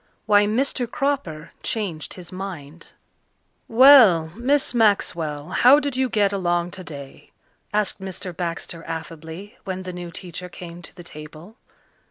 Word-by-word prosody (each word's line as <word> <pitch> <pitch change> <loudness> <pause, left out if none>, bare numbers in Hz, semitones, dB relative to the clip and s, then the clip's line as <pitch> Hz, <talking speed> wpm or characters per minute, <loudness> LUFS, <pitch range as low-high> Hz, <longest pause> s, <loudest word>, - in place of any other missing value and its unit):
Why 205 -1 +5
Mr. 245 +2 0
Cropper 225 - -2
Changed 180 -9 -4
His 180 -2 -10
Mind 170 -5 -8 0.7
"Well, 225 - +7
Miss 265 +4 +1
Maxwell, 170 -9 +1
how 255 +9 +6
did 285 -3 -3
you 260 0 +1
get 205 -3 +2
along 175 -2 0
today?" 145 -7 -9 0.4
asked 210 -2 0
Mr. 190 -1 -6
Baxter 170 -1 -4
affably, 165 +4 -8
when 190 -1 -4
the 185 -1 -6
new 175 -1 -7
teacher 180 +1 -8
came 175 0 -10
to - - -12
the 175 - -11
table. 155 +6 -11
185 Hz, 135 wpm, -23 LUFS, 165-215 Hz, 0.7 s, Well